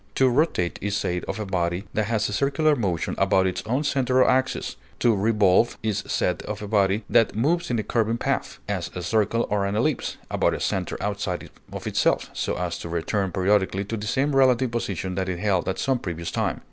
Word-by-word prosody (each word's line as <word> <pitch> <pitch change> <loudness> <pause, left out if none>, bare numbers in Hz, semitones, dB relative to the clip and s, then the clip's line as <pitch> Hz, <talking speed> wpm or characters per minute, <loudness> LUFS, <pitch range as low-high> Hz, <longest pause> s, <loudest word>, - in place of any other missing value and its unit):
To 130 -1 +4
rotate 125 - +1
is 100 0 -1
said 90 -3 -2
of - - -4
a 105 - -3
body 90 -1 -1
that 110 - +1
has 110 0 0
a 105 - -4
circular 145 +6 +2
motion 95 - -1
about 95 0 +3
its 95 - -1
own 130 +6 0
center 130 -3 +3
or - - +2
axis; 130 +1 +1 0.2
to 115 -2 +3
revolve 105 +1 +3
is 105 -2 -1
said 90 - 0
of 105 0 -4
a - - -5
body 100 0 +2
that 115 - +3
moves 170 +10 +1
in 120 - 0
a 110 - -1
curving 115 0 0
path, - - -2
as 95 -4 -2
a 90 - -4
circle 110 +4 +1
or 105 -1 +1
an 100 +1 -1
ellipse, 130 +7 0
about - - +2
a - - -5
center - - -2
outside 100 -3 -3 0.2
of - - -7
itself, - - +1
so - - -2
as 90 -1 -3
to 85 - -6
return 95 +3 -1
periodically 95 +1 +1
to 115 - -3
the 105 -1 -5
same 135 +4 +1
relative 130 -2 +4
position 95 -5 -3
that 95 0 -2
it 90 - -2
held 95 -2 0
at 95 - -2
some 135 -2 0
previous 85 -3 -4
time. - - -1
105 Hz, 215 wpm, -24 LUFS, 95-120 Hz, 0.2 s, To